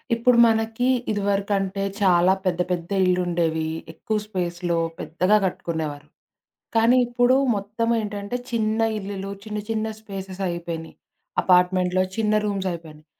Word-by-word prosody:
ఇప్పుడు 235 +1 +3
మనకి 225 +2 +1 0.2
ఇదివరకంటే 200 -1 0 0.2
చాలా 185 -1 +5
పెద్ద, 180 -1 +1
పెద్ద 175 -1 -2 0.2
ఇల్లుండేవి. 170 -3 +1 0.3
ఎక్కువ 215 +6 -2
స్పేస్‌లో 175 -3 -2 0.2
పెద్దగా 185 +6 +2
కట్టుకునేవారు. 160 -5 -3 0.7
కానీ 230 +3 +5
ఇప్పుడు 245 +1 +3 0.2
మొత్తం 210 +3 -2
ఏంటంటే, 205 +1 -4 0.2
చిన్న 220 -1 0 0.2
ఇల్లులు 195 -1 -5
చిన్న, 210 -1 -4
చిన్న 220 -1 0
స్పేసెస్ 195 -3 -7
అయిపోయినయి. 170 -2 -5 0.5
అపార్ట్‌మెంట్‌లో 180 0 +3
చిన్న 215 -1 +1
రూమ్స్ 195 -2 -1
అయిపోయినయి. 155 -3 -9
195 Hz, 115 wpm, -23 LUFS, 175-215 Hz, 0.7 s, చాలా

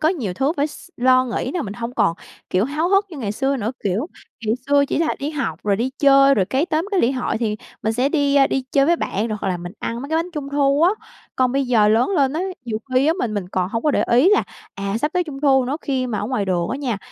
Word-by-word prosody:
có 315 - +3
nhiều 240 - -2
thứ 275 - +1
phải 285 - +1
s 310 - -12
lo 255 +1 +4
nghĩ 235 -4 -3
thế 255 - -3
là 355 - -1
mình 205 0 -6
hông 235 +1 -5
còn 200 -8 +2 0.4
kiểu 185 +4 +2
háo 305 +6 -1
hức 395 +1 +3
như 325 - -8
ngày 205 -5 -3
xưa 270 +4 0
nữa. 225 0 -2
Kiểu 205 - 0 0.4
ngày 220 - +2
xưa 285 0 +4
chỉ - - -1
là 325 -1 +1
đi 285 +2 -3
học 270 - -3
rồi 200 -1 +1
đi 245 +5 -1
chơi 275 -1 +6
rồi 195 - +2
cái 265 - 0
tóm 325 +2 -1
cái 390 - +2
lễ 245 +4 +2
hội 250 -3 -2
thì 215 -2 -1 0.3
mình 220 +1 0
sẽ 250 +4 +1
đi 285 -2 +2
đi 265 - 0
chơi 275 0 +4
với 340 +1 +3
bạn 220 -4 -2
rồi 215 - -3
hoặc 195 - -2
là 180 - 0
mình 175 +1 -8
ăn 230 +1 -4
mấy 280 - -7
cái 320 - 0
bánh 345 +2 -3
Trung 295 -4 -5
thu 280 +1 +2
á. 350 - +6 0.5
Còn 255 -1 +2
bây 275 -1 0
giờ 220 -4 +4
lớn 225 - +3
lên 280 -8 +2
á, 320 - -2 0.2
nhiều 220 -2 -3 0.2
khi 260 +3 +4
á, 320 - +4
mình 215 -3 -2
mình 190 -3 -3
còn 185 -1 -1
hông 230 +2 -3
có 300 - +2
để - - +1
ý 255 +9 +5
là, 420 - +4 0.3
à, 200 +2 -3
sắp 300 +7 -1
tới 360 -1 +1
Trung 280 -3 -8
thu 265 -3 +4
nữa, 270 +4 -2
khi 260 -3 -1
mà 215 -4 -3
ở 205 - -2
ngoài 245 -4 -1
đường 175 -3 -1
á - - -2
nha, 255 -7 -2
260 Hz, 295 wpm, -21 LUFS, 215-290 Hz, 0.5 s, chơi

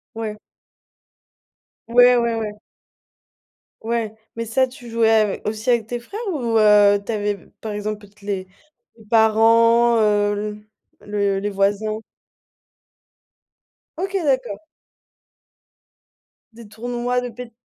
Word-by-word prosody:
Ouais. 215 -2 -5 1.5
Ouais, 245 +1 +6
ouais, 235 -1 +1
ouais. 210 -2 -5 1.2
Ouais. 225 -1 -2 0.2
Mais 230 0 -4
ça 260 +4 +1
tu 245 -2 -13
jouais 225 -1 +2
ave 215 -3 +2
aussi 215 +3 -3
avec 235 -3 +2
tes 240 0 -4
frères 400 - -9
ou 235 -6 0
heu, 205 -1 +5
tu - - -3
avais 205 -1 -1
b - - -19
par 220 - -5
exemple 210 0 -4
peut-être 205 0 -19
les 195 -2 -3 0.5
les 220 - -18
parents, 230 +1 +4
heu, 210 0 0 0.4
le 200 -1 -1
les 205 +1 -2
voisins? 205 +2 0 2.0
OK 385 +2 -3
d'accord! 260 -7 0 1.9
Des 230 -1 -13
tournois 245 +3 -2
de 245 - -5
pét? 235 0 -10
220 Hz, 120 wpm, -21 LUFS, 210-235 Hz, 2.0 s, Ouais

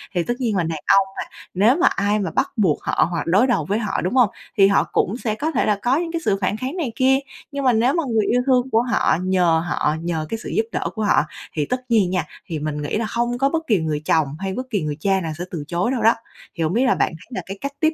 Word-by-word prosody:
Thì 175 - +2
tất 240 - -1
nhiên 230 -5 0
là 175 - +2
đàn 160 -2 -3 0.2
ông 195 -1 +3
mà, - - -2 0.3
nếu 210 +8 +4
mà 355 - +4
ai 205 +1 +1
mà 195 - -2
bắt - - 0
buộc 180 -8 +2
họ - - +1
hoặc 165 -4 -1
đối 200 +10 +4
đầu 235 - +1
với 205 +6 0
họ, 210 -3 -2
đúng 185 +8 -2
hông? 245 -6 +5 0.3
Thì 195 -1 +7
họ 200 - +3
cũng 210 +7 +1
sẽ 220 -4 -2
có 310 +7 -2
thể 275 - +1
là 205 -2 +1
có 255 +4 +2
những 335 -1 -2
cái 335 -1 -2
sự 195 - +2
phản 195 +3 0
kháng 260 +8 -4
này 300 -9 -2
kia. 265 +1 +3 0.3
Nhưng 280 -1 -3
mà 250 - +5
nếu 240 +5 +3
mà 335 - +1
người 220 -2 +2
yêu 245 +1 +2
thương 255 -1 +2
của 225 - +4
họ 240 -8 +1
nhờ 175 -3 +2
họ, 150 -3 0
nhờ 165 -2 -2
cái 225 - -2
sự - - -6
giúp 220 - 0
đỡ - - -2
của 220 - -2
họ 205 - +4 0.3
thì 150 -2 -1
tất 250 - -4
nhiên 205 -6 +4
nha, 180 -4 -1 0.2
thì 160 -3 -4
mình 150 0 -3
nghĩ 145 - -2
là 225 - -1
hông 240 +1 0
có 275 +2 +2
bất 325 +1 -2
kỳ 210 -7 +3
người 155 -2 -2
chồng 160 -3 +3
hay 195 0 -3
bất 255 +5 -5
kỳ 205 -6 -1
người 150 -1 -3
cha 195 +2 +1
nào 160 -2 -3
sẽ 175 - -4
từ 160 -5 -4
chối 180 +7 0
đâu 260 - -1
đó. 225 +1 +6 0.4
Thì 165 - -1
hổng 160 +3 0
biết 245 +4 +2
là 255 - +3
bạn - - +1
thấy - - -17
là 185 - -2
cái 195 +1 -7
cách 280 0 -4
tiếp 315 0 +2
210 Hz, 300 wpm, -21 LUFS, 175-250 Hz, 0.4 s, Thì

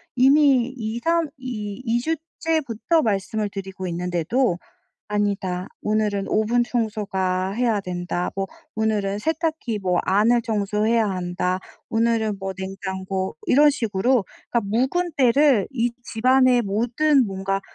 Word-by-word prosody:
이미 265 -1 +4
이삼 270 +10 0
이 215 -4 -5
이 235 0 +1
주째부터 320 -2 -1
말씀을 210 0 -1
드리고 190 -1 -6
있는데도 175 +4 0 0.5
"아니다. 195 -3 -1
오늘은 210 -2 0
오븐 230 +3 +2
청소가 195 -6 -1
해야 225 -1 +1
된다. 175 -1 -3
뭐 195 0 -2 0.3
오늘은 210 -2 0
세탁기 315 - -2
뭐 180 -2 +1
안을 220 +5 +4
청소해야 220 0 +1
한다. 180 0 -2 0.3
오늘은 225 -2 +1
뭐 195 0 -4
냉장고." 190 -1 -4
이런 295 +3 +6
식으로 230 -3 +1 0.3
그러니까 235 - +2 0.4
묵은 350 -2 -1
때를 260 -3 +4
이 240 -2 0
집안에 255 +1 +3
모든 245 +6 +2
뭔가 195 0 -2
215 Hz, 265 characters per minute, -23 LUFS, 195-250 Hz, 0.5 s, 이런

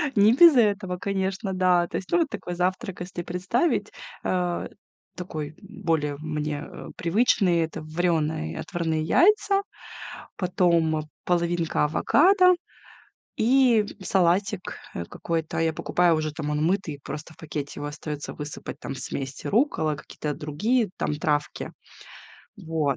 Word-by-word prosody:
Не 205 +1 +6
без 330 +3 +8
этого, 200 -6 +2
конечно, 190 +1 -2
да. 180 -2 +3
То - - -3
есть, 185 - -7
ну, 350 - +4
вот 320 - +1
такой 190 -6 -5
завтрак, 185 +2 -2
если 180 -1 -5
представить, 190 - 0 0.3
э, 180 -1 -1 0.5
такой 155 -4 -6
более 165 -8 -1
мне 150 -1 -3 0.3
привычный- 180 -1 +3
это 160 0 -2
варёные, 155 - -1
отварные 165 -4 -1
яйца, 395 - +4 0.8
потом 170 -4 +2 0.2
половинка 170 -2 +1
авокадо 365 - +5 0.8
и 240 -2 +4 0.2
салатик, 190 +2 +1 0.2
э, 85 - -3
какой-то. 160 - -3
Я 165 0 +2
покупаю 175 +2 +2
уже 155 -1 -2
там, 150 0 -4
он 150 +1 0
мытый, 170 -5 -1
просто 155 +3 -7
в - - -28
пакете 145 -2 -6
его 145 - -3
остаётся 150 0 -6
высыпать, 150 0 -7
там 135 - -5
смесь 135 0 -5
руккола, 200 - +1
какие-то 150 0 -5
другие 210 - +1
там - - -1
травки. 150 0 -1 0.8
Вот. 160 -7 -1
175 Hz, 130 wpm, -25 LUFS, 155-200 Hz, 0.8 s, без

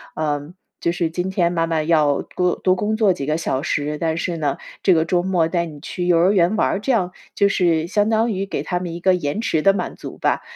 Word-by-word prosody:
呃， 150 0 -2 0.3
就 170 - +1
是： 170 -1 -1
“今 180 +3 -3
天 175 -3 +1
妈 165 -1 +1
妈 165 -1 0
要 155 -3 +2
多 180 -1 -1
多 185 -1 +2
工 210 +3 -1
作 215 -3 +3
几 155 -6 -5
个 155 +2 0
小 135 -5 -1
时， 150 -2 -1
但 160 0 -1
是 175 0 -2
呢， 145 -3 -1 0.3
这 190 - +5
个 160 -2 +3
周 175 +1 +1
末 180 -3 +1
带 170 0 0
你 155 -3 -10
去 180 +5 -5
幼 175 -1 +4
儿 180 +3 +4
园 185 0 +3
玩 - - +2
儿。” - - -1
这 270 - 0
样， 185 -7 +1 0.2
就 200 - +3
是 170 -4 +1
相 205 +2 +1
当 225 +1 +2
于 195 -1 -2
给 195 - -3
他 180 - -2
们 175 -2 -5
一 170 - -6
个 185 +2 +3
延 160 +2 -2
迟 230 -10 0
的 195 - +5
满 185 -2 -3
足 - - -9
吧， - - +1
175 Hz, 280 characters per minute, -21 LUFS, 160-190 Hz, 0.3 s, 这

